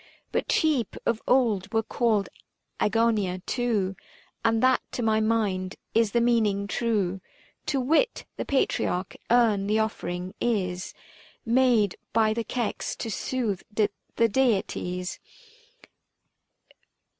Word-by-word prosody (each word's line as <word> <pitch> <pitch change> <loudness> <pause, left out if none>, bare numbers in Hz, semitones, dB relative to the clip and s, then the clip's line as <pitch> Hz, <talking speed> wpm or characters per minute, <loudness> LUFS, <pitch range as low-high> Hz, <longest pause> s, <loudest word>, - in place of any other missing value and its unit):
But - - -1
sheep 295 - +1
of 230 -1 0
old 225 -7 +2
were 225 -1 +1
called 220 -3 +1 0.5
Agonia 210 -4 +2
too, 215 -6 0 0.5
And 225 0 +2
that 260 0 +4
to 245 - -2
my 220 -1 +3
mind 210 -4 0 0.2
is 225 -2 +3
the 235 - +2
meaning 220 -4 +2
true; 200 -4 -1 0.5
To 280 -3 +1
wit: 320 - +1
the - - -3
patriarch 185 -8 0
Earn 225 -5 +3
the 210 +1 +2
offering 185 -4 -2
is 185 -6 -1 0.5
Made 235 -4 +3 0.2
by 220 -1 +3
the 230 +1 -2
Kex 235 -1 -3
to 225 - -5
soothe 220 -4 -2
the 210 -1 +2 0.4
deities. 190 -6 0
220 Hz, 115 wpm, -26 LUFS, 195-240 Hz, 0.5 s, that